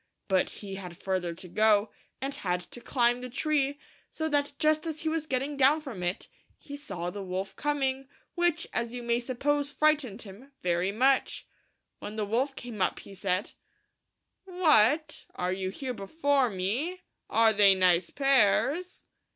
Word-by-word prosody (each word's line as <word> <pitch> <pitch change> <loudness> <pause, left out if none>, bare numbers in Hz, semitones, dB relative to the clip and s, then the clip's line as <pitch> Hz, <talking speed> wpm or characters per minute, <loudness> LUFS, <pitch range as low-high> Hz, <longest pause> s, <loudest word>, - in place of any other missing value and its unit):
But 190 -2 +2 0.2
he 195 -1 -6
had 180 -3 -8
further 180 -3 -2
to 180 +2 -11
go, 215 +2 +3 0.3
and 275 +1 -3
had 180 -6 -1
to 240 +7 -10
climb 245 -1 +1
the 250 - -6
tree, 285 +1 0 0.3
so 315 - -3
that 290 -1 0
just 310 +1 +2
as 315 -1 -4
he 320 - -1
was 315 -1 -2
getting 270 +2 -2
down 280 +3 +4
from 265 -11 -8
it 175 +1 -2 0.3
he 285 - -9
sav 290 +1 -9
THE - - -4
THREE - - -7
LITTLE 170 - -3
PIGS. 175 - -3
the 200 - -5
wolf 190 +1 -3
coming, 270 -2 -1 0.3
which, 345 -2 +1
as 235 0 -1
you 245 - -5
may 235 0 +1
suppose, 280 +4 0
frightened 290 -7 +1
him 225 +8 -13
very 175 +2 +1
much. 260 +5 +1 0.5
When 210 - -7
the 215 -1 -1
wolf 255 +6 0
came 235 -5 -7
up - - 0
he 200 - -12
said, 190 0 -1 0.9
"What! 310 - +3
are 180 +1 -1
you 190 0 -3
here 255 +6 -5
before 275 +4 +1
me? 235 - -2 0.3
are 225 -1 +4
they 200 -2 +6
nice 180 -2 +3
pears?" 275 - +2
245 Hz, 175 wpm, -28 LUFS, 195-290 Hz, 0.9 s, they